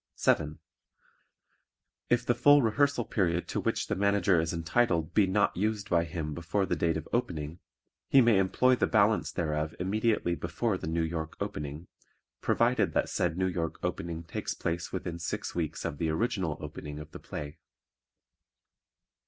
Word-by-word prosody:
7. 75 Hz, +1 st, +1 dB, 1.5 s
If 120 Hz, 0 st, +2 dB
the 120 Hz, -, +3 dB
full 145 Hz, +4 st, +6 dB
rehearsal 125 Hz, +2 st, +2 dB
period 90 Hz, -4 st, 0 dB
to -, -, -1 dB
which -, -, -1 dB
the -, -, -2 dB
Manager 100 Hz, -2 st, +3 dB
is 80 Hz, 0 st, 0 dB
entitled 85 Hz, -1 st, +1 dB
be 100 Hz, -3 st, +4 dB
not 100 Hz, +2 st, +2 dB
used 105 Hz, +1 st, -1 dB
by 85 Hz, -1 st, +3 dB
him 80 Hz, -2 st, -4 dB
before 85 Hz, +5 st, -1 dB
the -, -, 0 dB
date 85 Hz, -1 st, +1 dB
of 80 Hz, -, -6 dB
opening, 80 Hz, -8 st, -2 dB, 0.5 s
he 135 Hz, -, +6 dB
may 115 Hz, -5 st, +5 dB
employ 125 Hz, +7 st, +3 dB
the -, -, +1 dB
balance 110 Hz, 0 st, +3 dB
thereof 75 Hz, -2 st, -2 dB
immediately 105 Hz, 0 st, +1 dB
before 85 Hz, +6 st, -1 dB
the 90 Hz, -, -5 dB
New 80 Hz, +1 st, 0 dB
York 80 Hz, -1 st, -4 dB
opening, 75 Hz, +3 st, -5 dB, 0.6 s
provided -, -, +2 dB
that -, -, +1 dB
said 80 Hz, -, 0 dB
New 95 Hz, -, +1 dB
York 85 Hz, -3 st, -2 dB
opening 85 Hz, 0 st, -3 dB
takes 85 Hz, -, -4 dB
place 85 Hz, +1 st, -3 dB
within 85 Hz, -2 st, -4 dB
six 85 Hz, -, -3 dB
weeks 80 Hz, -3 st, -3 dB
of 70 Hz, -, -4 dB
the 80 Hz, -, 0 dB
original 95 Hz, -2 st, -1 dB
opening 75 Hz, 0 st, -7 dB
of 75 Hz, +1 st, -9 dB
the -, -, -9 dB
play. 75 Hz, +1 st, -7 dB
85 Hz, 160 wpm, -29 LUFS, 80-105 Hz, 1.5 s, full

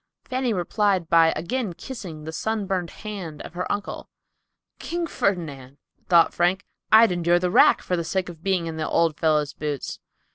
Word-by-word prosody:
Fanny 255 Hz, -1 st, -1 dB
replied 190 Hz, -2 st, 0 dB
by 165 Hz, -1 st, +5 dB
again 185 Hz, +5 st, -2 dB
kissing 180 Hz, -, -8 dB
the 160 Hz, -, -6 dB
sunburned 195 Hz, -1 st, -2 dB
hand 195 Hz, -8 st, -7 dB
of -, -, -10 dB
her 180 Hz, +1 st, -3 dB
uncle. 205 Hz, -, -4 dB, 0.7 s
"King 345 Hz, 0 st, -3 dB
Ferdinand!" 145 Hz, -, -2 dB, 0.3 s
thought 170 Hz, -2 st, +5 dB
Frank, 180 Hz, +3 st, +1 dB, 0.3 s
"I'd 220 Hz, -1 st, +7 dB
endure 175 Hz, 0 st, +2 dB
the 180 Hz, 0 st, 0 dB
rack -, -, +5 dB
for 180 Hz, -, -1 dB
the 170 Hz, -, -2 dB
sake 185 Hz, +3 st, -2 dB
of 170 Hz, -3 st, -10 dB
being 190 Hz, -3 st, 0 dB
in 165 Hz, -1 st, -5 dB
the 155 Hz, -, -2 dB
old 165 Hz, -2 st, +1 dB
fellow's 150 Hz, -2 st, +1 dB
boots." 145 Hz, -3 st, -4 dB
175 Hz, 170 wpm, -24 LUFS, 160-200 Hz, 0.7 s, I'd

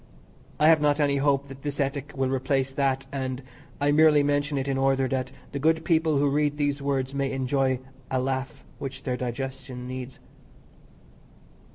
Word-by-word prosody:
I 150 Hz, -, +5 dB
have 160 Hz, -1 st, +6 dB
not 145 Hz, 0 st, +3 dB
any 140 Hz, -1 st, +2 dB
hope 140 Hz, 0 st, +2 dB
that 135 Hz, -1 st, -11 dB
this 145 Hz, 0 st, -4 dB
ethic 140 Hz, +1 st, -1 dB
will 130 Hz, -1 st, 0 dB
replace 135 Hz, 0 st, 0 dB
that, 135 Hz, -1 st, 0 dB
and 130 Hz, -1 st, -3 dB, 0.4 s
I 145 Hz, 0 st, +2 dB
merely 150 Hz, -1 st, +6 dB
mention 145 Hz, 0 st, +1 dB
it 135 Hz, 0 st, -2 dB
in 135 Hz, -, 0 dB
order 135 Hz, 0 st, +2 dB
that 130 Hz, 0 st, -2 dB, 0.2 s
the 140 Hz, -, -3 dB
good 160 Hz, +2 st, +2 dB
people 160 Hz, -3 st, +3 dB
who 145 Hz, +1 st, +3 dB
read 145 Hz, +1 st, +1 dB
these 145 Hz, -1 st, 0 dB
words 135 Hz, -1 st, -1 dB
may 140 Hz, -1 st, -1 dB
enjoy 130 Hz, 0 st, +1 dB, 0.3 s
the 130 Hz, -, 0 dB
laugh 135 Hz, +2 st, -2 dB
which 135 Hz, 0 st, -6 dB
their 125 Hz, -3 st, -1 dB
digestion 125 Hz, 0 st, -5 dB
needs. 130 Hz, 0 st, -6 dB
135 Hz, 175 wpm, -26 LUFS, 130-145 Hz, 0.4 s, have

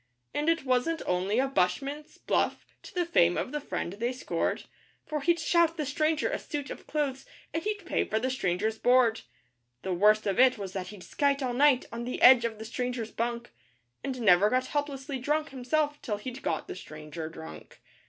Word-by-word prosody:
And 300 Hz, +2 st, 0 dB
it 330 Hz, -4 st, +1 dB
wasn't 260 Hz, +6 st, +1 dB
only 185 Hz, +4 st, 0 dB
a 265 Hz, +2 st, +3 dB
bushman's 275 Hz, +8 st, -1 dB
'bluff' -, -, 0 dB, 0.2 s
to -, -, -13 dB
the 355 Hz, -1 st, +1 dB
fame 175 Hz, -, +3 dB
of -, -, -2 dB
the 295 Hz, -, -3 dB
Friend 180 Hz, -6 st, -4 dB
they 235 Hz, +4 st, -2 dB
scored, 255 Hz, -, -2 dB, 0.4 s
For 305 Hz, -1 st, -3 dB
he'd 340 Hz, +3 st, +2 dB
shout 335 Hz, 0 st, +2 dB
the 305 Hz, -, -1 dB
stranger 310 Hz, +2 st, +1 dB
a -, -, -2 dB
suit 290 Hz, -3 st, -5 dB
of -, -, -9 dB
clothes, 275 Hz, -3 st, -1 dB, 0.3 s
and 325 Hz, -, -1 dB
he'd 415 Hz, 0 st, -3 dB
pay -, -, +1 dB
for 215 Hz, -, -1 dB
the 255 Hz, +4 st, 0 dB
stranger's 215 Hz, -1 st, -1 dB
board 245 Hz, -2 st, +4 dB, 0.6 s
The 190 Hz, -, -1 dB
worst 210 Hz, +4 st, +4 dB
of 195 Hz, 0 st, 0 dB
it 255 Hz, -1 st, +6 dB
was 195 Hz, -2 st, -6 dB
that 185 Hz, -2 st, -4 dB
he'd 200 Hz, -2 st, -10 dB
skite 280 Hz, -1 st, 0 dB
all 250 Hz, -1 st, -1 dB
night 270 Hz, 0 st, +4 dB
on 235 Hz, +1 st, -5 dB
the 250 Hz, -, -4 dB
edge 250 Hz, -2 st, +8 dB
of 225 Hz, -2 st, -3 dB
the 220 Hz, -, -8 dB
stranger's 235 Hz, -1 st, -3 dB
bunk, 235 Hz, +1 st, -3 dB, 0.5 s
And 260 Hz, -3 st, -4 dB
never 200 Hz, -1 st, +5 dB
got 255 Hz, +2 st, +1 dB
helplessly 280 Hz, -1 st, -3 dB
drunk 300 Hz, +4 st, 0 dB
himself 290 Hz, +3 st, -1 dB
till 210 Hz, -3 st, -2 dB
he'd 250 Hz, +5 st, -7 dB
got -, -, -2 dB
the -, -, -6 dB
stranger 155 Hz, -1 st, -7 dB
drunk. 160 Hz, 0 st, -11 dB
255 Hz, 200 wpm, -29 LUFS, 215-290 Hz, 0.6 s, edge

